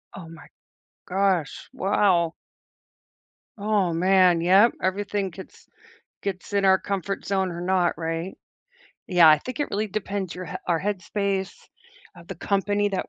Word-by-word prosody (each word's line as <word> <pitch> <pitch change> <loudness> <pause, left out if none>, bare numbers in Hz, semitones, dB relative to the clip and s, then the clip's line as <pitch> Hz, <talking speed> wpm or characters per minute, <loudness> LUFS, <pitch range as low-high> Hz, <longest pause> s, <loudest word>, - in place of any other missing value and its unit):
Oh 175 -4 -10
my 165 -1 -13 0.6
gosh, 185 -5 -1
wow. 185 -4 +2 1.2
Oh 205 -4 0
man, 180 0 +4
yep, 195 +7 +5
everything 200 +1 -1
gets 190 +2 -13 0.6
gets 195 0 -5
in 200 -1 +1
our 190 -1 +5
comfort 195 0 -4
zone 190 -2 0
or 170 0 -6
not, 180 -2 +1
right? 165 +2 -4 0.7
Yeah, 175 -4 +6
I 155 -1 +7
think 255 - -7
it 290 - -2
really 210 +2 -1
depends 200 -2 -4
your 185 0 -7
h - - -5
our 170 -2 +1
headspace, 200 0 -2 0.6
of 170 -1 -16
the 190 - -5
company 205 +3 0
that 190 - -3
190 Hz, 140 wpm, -24 LUFS, 175-200 Hz, 1.2 s, I